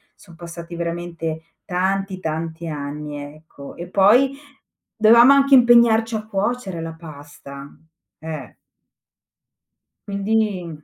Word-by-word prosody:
son 180 -4 -18
passati 170 0 -9
veramente 170 -1 -5 0.2
tanti, 190 +1 -2
tanti 160 0 -5
anni, 150 0 -6 0.2
ecco. 155 -3 -13
E 175 - -7
poi, 210 +9 +4 0.6
dovevamo 235 +4 +6
anche 275 0 +3
impegnarci 235 -2 +5
a 215 0 -4
cuocere 200 -3 -3
la 165 0 -6
pasta. 145 -3 -12 0.5
Eh. 155 -4 -8 1.5
Quindi 200 -6 -2
175 Hz, 100 wpm, -21 LUFS, 160-215 Hz, 1.5 s, dovevamo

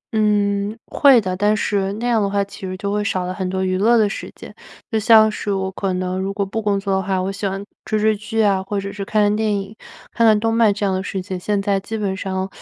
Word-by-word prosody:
嗯， 205 0 +1
会 275 -4 +5
的， 185 -4 -2
但 205 +3 +2
是 200 -2 0
那 220 +4 -5
样 230 -3 +2
的 200 - 0
话 200 0 +1
其 200 - -12
实 185 0 -5
就 200 +2 -3
会 210 0 0
少 185 -2 -1
了 180 - -3
很 185 -1 -3
多 190 0 -1
娱 185 0 0
乐 235 +4 +4
的 215 -2 +4
时 200 - -6
间。 - - -11 0.4
就 220 - +1
像 220 0 +6
是 210 - -4
我 190 -1 -1
可 190 0 -2
能 185 0 -2
如 190 +1 -2
果 200 0 -2
不 225 +4 -4
工 205 -2 0
作 195 0 -2
的 190 - +1
话， 190 -1 -1
我 185 +1 -2
喜 200 +1 -3
欢 195 +1 -4 0.2
追 215 - -1
追 215 0 +2
剧 225 +2 -4
啊， 200 -3 +3
或 200 +1 -3
者 200 0 -6
是 205 - -5
看 210 +2 +1
看 205 0 +2
电 215 0 0
影， 195 +2 -8 0.4
看 230 - +2
看 215 -1 +5
动 225 +1 0
漫 225 -2 +4
这 205 0 -2
样 195 - +1
的 185 - -1
事 195 0 -4
情， 185 0 -5
现 205 +2 -1
在 195 0 0
基 220 +3 -5
本 200 -3 -2
上 190 0 -3
200 Hz, 300 characters per minute, -20 LUFS, 190-215 Hz, 0.4 s, 像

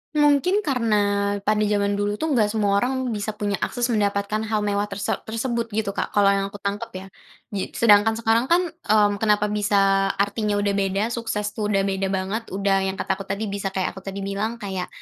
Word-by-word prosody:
Mungkin 295 +7 +3
karena 245 - +1 0.5
pada 215 +1 +2
zaman 205 -1 +1
dulu 205 0 0
tuh 315 +6 -2
nggak 225 -6 +3
semua 205 -2 +1
orang 255 0 -1
bisa 210 0 -3
punya 205 -1 -2
akses 245 0 -1
mendapatkan 205 0 0
hal 215 -1 0
mewah 205 0 0
terse 200 0 -3 0.2
tersebut 230 +1 -2
gitu 215 -2 0
Kak, 200 - -4
kalau 200 -1 +5
yang 195 0 0
aku 200 - -12
tangkap 200 0 -3
ya. 190 0 -8 0.4
Gi 195 -2 -4
sedangkan 220 0 +5
sekarang 230 +2 +1
kan, 345 +3 +4
mmm, 210 - +2
kenapa 210 -1 +2
bisa 195 -2 +2
artinya 205 +1 0
udah 205 0 +1
beda, 195 0 0
sukses 210 -3 -2
tuh 210 -1 -3
udah 195 -2 +1
beda 195 0 -1
banget, 195 +4 -2
udah 195 0 0
yang 190 - -2
kata - - -2
aku 195 - -7
tadi 200 +3 -3
bisa 195 -1 -4
kayak 190 -1 0
aku 190 - -10
tadi 195 0 -4
bilang, 200 +4 -2
kayak 195 -5 -4
205 Hz, 200 wpm, -23 LUFS, 200-225 Hz, 0.5 s, kalau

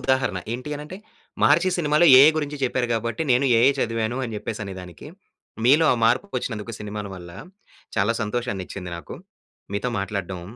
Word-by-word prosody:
ఉదాహరణ. 130 -7 0 0.2
ఏంటి 130 +5 -5
అనంటే, 150 +5 -8 0.5
'మహర్షి' 185 -1 +4
సినిమాలో 155 +1 +4
ఏఐ 145 +4 +9
గురించి 150 -1 -4
చెప్పారు 125 -1 -1
గాబట్టి, 115 +5 -2
నేను 125 +3 +3
ఏఐ 125 +4 +6
చదివాను 115 +1 -1
అని 115 -2 -5
జెప్పేసనేదానికి, 95 - -7 0.6
మీలో 150 +5 +5
ఆ - - -3
మార్పుకొచ్చినందుకు 115 - -1
సినిమాల 105 0 -5
వల్ల, 90 -1 -10 0.7
చాలా 105 +3 +2
సంతోషాన్నిచ్చింది 100 -5 -4
నాకు. 85 - -9 0.6
మీతో 100 +5 -1
మాట్లాడడం 95 -3 -4
115 Hz, 135 wpm, -23 LUFS, 100-135 Hz, 0.7 s, ఏఐ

